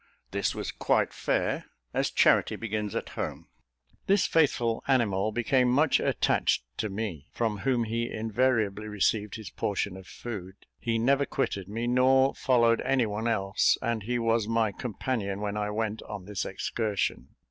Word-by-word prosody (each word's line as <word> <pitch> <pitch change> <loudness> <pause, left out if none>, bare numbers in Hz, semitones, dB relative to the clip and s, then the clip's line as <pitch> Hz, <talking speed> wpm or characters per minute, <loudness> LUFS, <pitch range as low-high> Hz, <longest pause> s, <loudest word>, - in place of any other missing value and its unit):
This - - -1
was - - -3
quite - - +1
fair, - - -1 0.3
as - - +1
charity - - +4
begins 105 -2 -3
at - - -3
home. - - -5 0.6
This 195 -1 +4
faithful 120 -8 +2
animal 110 -6 +2
became 125 +2 +2
much 145 +4 +4
attached - - +1
to 110 - -1
me, 95 -8 -4
from 110 -3 -1
whom 125 0 +1
he 115 +1 -2
invariably 110 -2 0
received 105 0 0
his 110 -2 -8
portion 100 -1 -2
of 95 -1 -11
food. 95 -6 -7 0.2
He 115 -1 0
never 140 +5 +2
quitted 100 -8 -2
me, 115 +3 -3
nor 130 +2 +4
followed 115 -3 +3
any 130 -2 +2
one 105 +2 -2
else; 100 -3 +2
and 115 -3 -1
he 120 +4 -1
was 115 -2 +1
my 115 -2 +1
companion 105 -2 -3
when 105 0 -3
I 105 0 -1
went 110 0 -2
on 105 -3 -8
this 100 -2 -3
excursion. 105 -4 -2
115 Hz, 160 wpm, -28 LUFS, 105-120 Hz, 0.6 s, charity